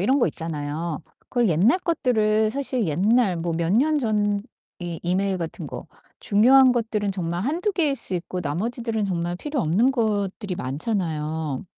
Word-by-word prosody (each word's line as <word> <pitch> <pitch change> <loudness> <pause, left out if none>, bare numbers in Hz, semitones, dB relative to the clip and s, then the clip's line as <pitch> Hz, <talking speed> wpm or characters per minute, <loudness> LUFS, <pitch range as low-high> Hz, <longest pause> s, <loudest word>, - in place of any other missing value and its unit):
이런 260 +9 +3
거 - - +4
있잖아요. 155 0 -4 0.3
그걸 240 -4 +1
옛날 195 - +3
것들을 220 -10 +1
사실 260 -5 -1
옛날 195 +5 +2
뭐 170 0 -2
몇 170 +1 0
년 300 +8 +3
전 205 -4 0 0.4
이 175 -2 -5
이메일 185 +2 0
같은 165 -1 -5
거 - - -8 0.3
중요한 255 +5 +5
것들은 220 -4 -1
정말 175 -2 -3
1-2 340 - 0
개일 305 -7 +1
수 225 - -2
있고 180 +1 -4
나머지들은 220 - -2
정말 175 -2 -2
필요 290 +10 -4
없는 200 +12 +3
것들이 205 -5 -1
많잖아요. 155 - -3
205 Hz, 305 characters per minute, -24 LUFS, 170-240 Hz, 0.4 s, 중요한